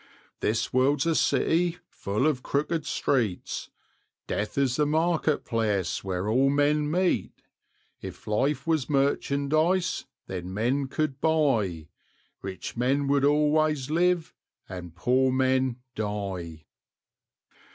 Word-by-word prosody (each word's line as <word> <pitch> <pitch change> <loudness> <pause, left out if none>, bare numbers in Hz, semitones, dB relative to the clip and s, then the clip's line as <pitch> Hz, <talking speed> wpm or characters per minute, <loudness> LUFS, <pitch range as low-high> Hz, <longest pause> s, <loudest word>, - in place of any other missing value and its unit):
This 110 +1 -1
world's 135 +3 +3
a 165 - +2
city, 170 +2 +2
full 105 - -2
of 150 -5 +1
crooked 150 +3 -1
streets, 115 -11 -1 0.6
Death 105 +5 -3
is 135 -2 +2
the 150 -1 +2
market 160 -1 +1
place 105 -6 -1
where 95 0 -2
all 130 +5 +3
men 145 +1 +2
meet; 180 +3 0 0.6
If - - -9
life 135 +10 0
was 160 -5 0
merchandise, 145 +5 +1 0.2
then 90 0 -6
men 130 +6 0
could 140 -1 -2
buy, 115 - +1 0.5
Rich 95 -1 -6
men 135 +4 +1
would 140 -1 +3
always 150 -1 +2
live, 175 0 +1 0.3
and 90 -3 -8
poor 130 +8 +2
men 130 -1 +2 0.2
die. 95 -7 -4
135 Hz, 115 wpm, -27 LUFS, 105-150 Hz, 0.6 s, world's